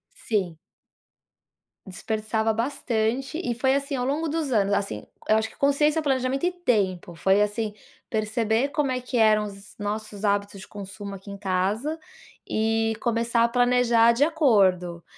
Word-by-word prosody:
Sim. 190 - -2 1.3
Desperdiçava 220 +3 -2
bastante 240 +3 -1
e 240 -6 -1
foi 265 +2 +2
assim 280 0 -1
ao 250 -1 -1
longo 300 +4 -1
dos 310 -2 -2
anos, 200 -3 +2
assim, 200 - -2 0.2
eu 215 - +4
acho 220 0 -1
que - - -19
consciência, 295 +3 +2
planejamento 265 +1 0
e 360 - +2
tempo, 200 - -1
foi, 190 +4 +3
assim, 210 +1 -1 0.4
perceber 220 +3 0
como 285 -2 0
é 255 - -1
que 250 0 -3
eram 215 -2 +4
os 200 0 -11
nossos 210 0 -4
hábitos 200 0 0
de - - -11
consumo 200 0 -8
aqui 195 +1 -10
em 200 - -7
casa 200 +10 -1 0.5
e 225 0 +1
começar 230 0 +1
a 235 - +4
planejar 245 -1 +4
de 235 +4 +2
acordo, 195 - +2
225 Hz, 155 wpm, -25 LUFS, 205-255 Hz, 1.3 s, eu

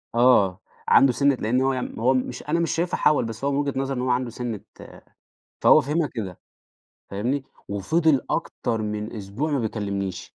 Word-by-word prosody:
آه، 115 -7 +4 0.3
عنده 135 -2 +6
سِنّة 140 +3 +3
لأن 125 +2 0
هو 135 0 +2
م - - -7
هو 125 +4 +3
مش 125 -1 -2
أنا 160 +3 0
مش 170 - 0
شايفها 170 +2 -1
حَول، 150 -5 +3
بس 115 +1 -7
هو 140 - +1
من 140 - 0
وجهة 140 -1 0
نظره 135 0 -2
إن 125 - -2
هو 130 - -1
عنده 125 0 0
سِنة 120 -2 -5 1.0
فهو - - +7
فهمها 150 +3 0
كده، 95 -7 -5 0.7
فاهمني، 125 +8 -2 0.2
وفضل 150 - +2
أكتر 110 -1 -2
من 105 +1 -4
أسبوع 105 +10 -3
ما 145 - +1
بيكلمنيش. 100 -5 -4
125 Hz, 180 wpm, -24 LUFS, 105-140 Hz, 1.0 s, فهو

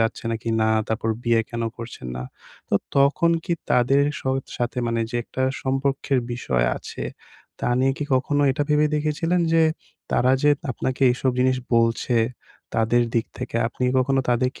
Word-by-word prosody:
যাচ্ছে 115 +1 -1
না 115 - 0
কিনা, 110 -1 +1 0.2
তারপর 110 0 -1
বিয়ে 115 -1 +3
কেন 115 0 -3
করছেন 115 - -8
না। 60 - -4 0.5
তো - - 0 0.2
তখন 140 +5 +4
কি 175 - -1 0.2
তাদের 135 +3 +4 0.2
স - - -15 0.3
সাথে 120 +1 -2
মানে 115 0 0
যে - - 0
একটা 130 - -4 0.2
সম্পর্কের 135 0 0
বিষয় 65 - 0
আছে। - - -7 0.6
তা - - 0
নিয়ে 135 +1 +3
কি 145 - -2
কখনো 145 +3 +1
এটা 140 +2 0
ভেবে 150 0 +4
দেখেছিলেন 165 +4 0
যে 165 0 +5 0.5
তারা 130 +1 +3
যে 150 - +5 0.2
আপনাকে 130 +1 -2
এসব 130 +1 0
জিনিস 130 0 +3 0.2
বলছে 115 +1 +2 0.6
তাদের 115 +2 +3
দিক 115 - +1
থেকে 125 -2 -4
আপনি 125 - -3
কখনো 135 +1 +2
তাদেরকে 125 +2 0
130 Hz, 165 wpm, -23 LUFS, 115-140 Hz, 0.6 s, যে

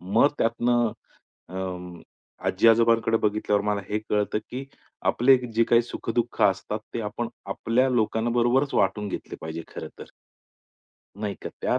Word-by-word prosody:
मग 100 +10 +3
त्यातनं 120 0 +2 0.6
अं, 90 -2 -6 0.5
आजी-आजोबांकडे 115 +2 +4
बघितल्यावर 105 -1 +1
मला 105 -1 0
हे 105 - 0
कळतं, 105 0 +1
की 130 +2 -5 0.5
आपले 130 +3 +5 0.2
जे 115 +1 +4
काही 115 +1 +4
सुख-दुःख 120 0 -3
असतात 100 +2 +2 0.2
ते 120 - -1
आपण 115 +3 -3 0.2
आपल्या 115 +6 +1
लोकांबरोबरच 120 +3 +1
वाटून 100 +2 +1
घेतले - - -6
पाहिजे 80 +1 -5
खरं - - -6
तर. - - -9 1.1
नाही 105 -2 -2
का? - - -4
त्या - - +2
110 Hz, 130 wpm, -25 LUFS, 100-120 Hz, 1.1 s, आपले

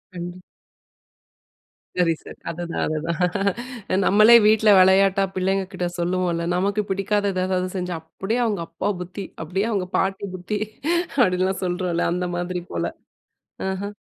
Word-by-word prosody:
கண்டிப் 175 +1 -6 1.6
சரி, 175 -2 +3
சரி - - -11
அதுதான், 170 0 -3
அதுதான். 185 - -1
நம்மளே 215 +4 +7
வீட்ல 215 0 +4
வெளையாட்டா 195 +1 +5
பிள்ளைங்க 190 +1 0
கிட்ட 180 -1 -2
சொல்லுவோம்ல, 175 -1 0
நமக்கு 200 +3 +1
பிடிக்காதது 195 -1 0
எதாவது 185 -1 0
செஞ்சா, 180 -2 -3 0.2
அப்டியே 220 +5 0
அவங்க 205 -6 -1
அப்பா 200 - -3
புத்தி, 185 +2 -6 0.2
அப்டியே 190 +6 -1
அவங்க 190 -3 -1
பாட்டி 195 +1 -1
புத்தி 185 +3 -3 0.7
அப்டிலாம் 185 +1 0
சொல்றோம்ல. 175 -1 -1
அந்த 180 0 -1
மாதிரி 180 0 -3
போல. - - -1 0.9
அஹ. 200 +2 -4
185 Hz, 125 wpm, -23 LUFS, 180-200 Hz, 1.6 s, நம்மளே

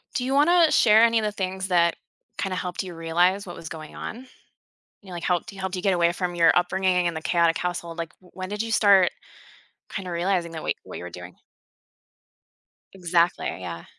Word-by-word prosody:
Do 250 - -1
you 270 - -1
wanna 330 +3 +5
share 220 0 +6
any 230 -1 +4
of 215 - -2
the 210 - -1
things 190 -1 -3
that 170 -2 +3 0.4
kinda 190 -2 -2
helped 180 +1 -3
you 180 -2 -8
realize 175 +4 +1
what 175 - -8
was 160 - -9
going 155 -2 -9
on? 225 - -6 0.8
You 200 - -18
know, - - -9
like, 170 - -6
helped 180 +4 -1
y 195 - -13
helped 190 0 -3
you 180 - -4
get 195 -2 +2
away 170 0 +2
from 175 0 -3
your 165 -1 +4
upbringing, 180 0 +2
and 165 - -4
the 160 - -5
chaotic 170 -1 +2
household 175 -1 -4
like, 165 -1 -4
w 180 - -21
when 185 0 -6
did 210 +2 -3
you 225 0 -4
start 200 -4 +5 0.8
kinda 185 -3 -5
realizing 170 -1 -1
that 160 - -6
wha - - -1
what - - -9
you - - -8
were 90 - -6
doing 90 0 -10 1.6
Exactly, 175 -1 +1 0.2
yeah. 85 -2 -7
180 Hz, 210 wpm, -24 LUFS, 170-195 Hz, 1.6 s, share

